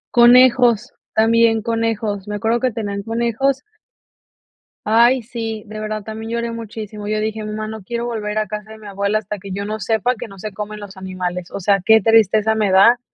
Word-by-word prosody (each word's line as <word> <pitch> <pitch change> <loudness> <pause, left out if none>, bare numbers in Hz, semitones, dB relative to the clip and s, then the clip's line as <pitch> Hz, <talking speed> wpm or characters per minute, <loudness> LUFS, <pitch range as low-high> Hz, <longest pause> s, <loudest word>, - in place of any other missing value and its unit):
Conejos, 245 -1 +5 0.2
también 225 0 +3
conejos, 225 -3 -2
me 210 - -3
acuerdo 225 +3 0
que 255 - +1
tenían 205 -3 -4
conejos 235 +5 -1 1.2
Ay, 235 +4 +4
sí, 225 -2 -5
de 215 0 -8
verdad, 215 0 -4
también 220 +1 -7
lloré 235 0 -2
muchísimo, 215 -2 -7
yo 215 0 -1
dije: 220 0 -3
"Mamá, 215 0 -4
no 220 -2 -8
quiero 235 +4 -4
volver 215 -3 -3
a 215 0 0
casa 210 0 -7
de 220 - -10
mi 215 -1 -12
abuela 200 +1 0
hasta 210 0 -6
que 195 +1 -9
yo 200 +1 -3
no 215 +1 -4
sepa 225 +4 0
que 225 - -7
no 195 -2 -13
se 215 +2 -5
comen 210 +1 -7
los 200 -1 -10
animales, 180 -1 -5
o 200 - -5
sea, 200 +2 +3
qué 220 0 +6
tristeza 220 -1 +4
me 215 -2 +1
da 200 +6 +6
215 Hz, 195 wpm, -19 LUFS, 205-230 Hz, 1.2 s, qué